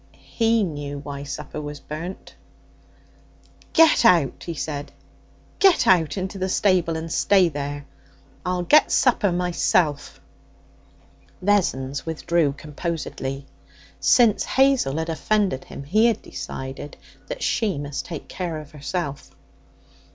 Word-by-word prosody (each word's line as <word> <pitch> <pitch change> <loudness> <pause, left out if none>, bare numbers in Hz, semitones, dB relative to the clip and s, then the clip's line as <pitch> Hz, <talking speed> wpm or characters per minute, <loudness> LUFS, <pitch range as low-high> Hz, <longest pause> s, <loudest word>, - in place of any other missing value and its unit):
He 225 -1 +3
knew 145 -5 -4
why 140 0 -7
supper 145 +1 -6
was 145 -1 -7
burnt. 165 +7 -7 1.4
'Get 325 -5 +5
out!' 170 - +3
he 170 - -4
said. 145 -1 -5 0.7
'Get 385 -4 +5
out 165 -2 +3
into 190 +1 -4
the 185 0 -1
stable 180 -4 +2
and 160 0 -6
stay 190 0 +4
there. 145 -1 -5 0.6
I'll 180 -1 -1
get 300 - +5
supper 225 -6 +3
myself.' 175 -4 0 1.2
Vessons 160 -9 0
withdrew 160 -2 0
composedly. 145 -3 -5 0.5
Since 235 -4 +4
Hazel 265 - +2
had 160 +1 -2
offended 190 -3 0
him, - - -9
he 215 +11 +3
had 230 - 0
decided 135 +2 -7 0.3
that - - -5
she 210 -9 0
must 145 -1 -4
take 165 -5 -7
care 175 -4 -4
of 150 -1 -12
herself. 150 -1 -4
165 Hz, 120 wpm, -23 LUFS, 145-195 Hz, 1.4 s, Get